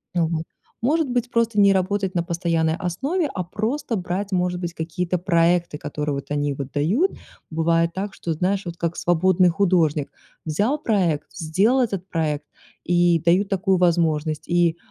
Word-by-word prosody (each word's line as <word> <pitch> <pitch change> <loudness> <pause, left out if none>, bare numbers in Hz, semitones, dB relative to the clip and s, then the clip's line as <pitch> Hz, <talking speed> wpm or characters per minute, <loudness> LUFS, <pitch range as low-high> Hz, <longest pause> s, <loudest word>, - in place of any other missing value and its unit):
Мгм. 165 -1 0 0.4
Может 300 +3 +1
быть, 245 -1 -1
просто 230 -2 +1
не 200 0 +6
работать 190 +1 0
на 175 - +1
постоянной 165 -2 0
основе, 270 - -1
а 180 - -2
просто 230 - -2
брать, 190 +2 -3
может 180 0 0
быть, 175 -1 -4
какие-то 175 +2 -2
проекты, 170 -2 +2
которые 150 0 -3
вот 140 - -6
они 145 -1 0
вот 135 0 -6
дают. 200 - +2 0.4
Бывает 165 +1 +1
так, 195 +1 -4
что, 165 - -3
знаешь, 185 +4 -1
вот 170 - -5
как 170 0 -2
свободный 180 +1 +3
художник: 165 -6 +1 0.3
взял 205 - 0
проект, 180 - 0
сделал 195 +10 +1
этот 195 -6 -2
проект, 150 -3 -1 0.4
и 175 -1 +3
дают 185 +4 +4
такую 190 -1 +1
возможность, 160 -3 +1
и, 170 -1 +2
175 Hz, 155 wpm, -22 LUFS, 165-200 Hz, 0.4 s, не